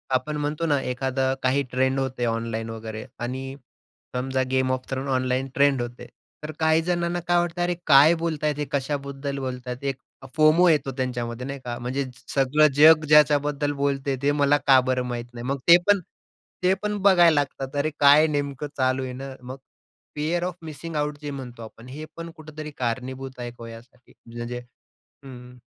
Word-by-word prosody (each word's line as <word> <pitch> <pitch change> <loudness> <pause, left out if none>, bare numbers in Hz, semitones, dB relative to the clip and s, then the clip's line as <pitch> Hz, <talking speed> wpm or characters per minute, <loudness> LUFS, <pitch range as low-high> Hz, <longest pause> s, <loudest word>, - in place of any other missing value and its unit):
आपण 150 +4 -1
म्हणतो 150 +3 -2
ना, 145 -3 +2
एखादं 130 +1 -1
काही 130 +2 +2
ट्रेंड 130 +1 +1
होतं 130 -2 -2
ऑनलाईन 115 0 -3
वगैरे 110 0 -7 0.2
आणि 130 +2 -4 0.6
समजा 130 +1 0
'game 130 0 +1
of 130 0 -2
thrones' 135 +1 -3
online 130 0 0
trend 140 -2 +3
होतंय, 120 0 -7 0.4
तर 155 - -5
काही 160 0 +3
जणांना 175 0 -1
काय 175 0 +3
वाटतं, 175 0 -2
"अरे 175 0 0
काय 145 +3 +7
बोलतायत 155 -3 -1
हे, 150 - -1
कशाबद्दल 140 0 -3
बोलतायत?" 125 -1 -5
एक 135 -1 -2 0.4
फोमो 155 +3 +5
येतो 145 -3 +2
त्यांच्यामध्ये 125 -1 -3
नाही 140 0 -5
का, 120 -1 -4
म्हणजे 130 +3 -2 0.3
"सगळं 140 +3 +4
जग 155 +1 +7
ज्याच्याबद्दल 145 -1 +4
बोलतंय 140 -1 0
ते 140 +1 +2
मला 145 0 +3
का 135 -1 +8
बरं 130 0 0
माहीत 120 -1 -4
नाही?" 120 0 -7
मग 140 +1 -1
ते 170 0 +10
पण, 205 -1 +5 0.6
ते 185 +1 +4
पण 210 0 -1
बघायला 175 -4 +6
लागतात. 135 0 -6
"अरे 155 +2 0
काय 145 +2 +7
नेमकं 145 -1 -3
चालू 130 0 +1
आहे 130 -1 -5
ना." 135 +2 -7
मग 130 +2 -7 0.6
फिअर 160 +4 -1
ऑफ 180 0 -3
मिसिंग 160 +1 -7
आउट 150 0 -1
जे 145 -1 -5
म्हणतो 125 -4 -8
आपण, 115 +2 -12
हे 145 +4 -7
पण 165 0 -6
कुठेतरी 155 -1 -9
कारणीभूत 130 +2 -4
आहे 120 0 -4
का - - -21
हो - - -8
यासाठी? 115 +2 -14 0.2
म्हणजे 120 +1 -5 0.7
हं, 135 - -9 0.2
हं. 125 - -16
135 Hz, 180 wpm, -24 LUFS, 130-150 Hz, 0.7 s, ते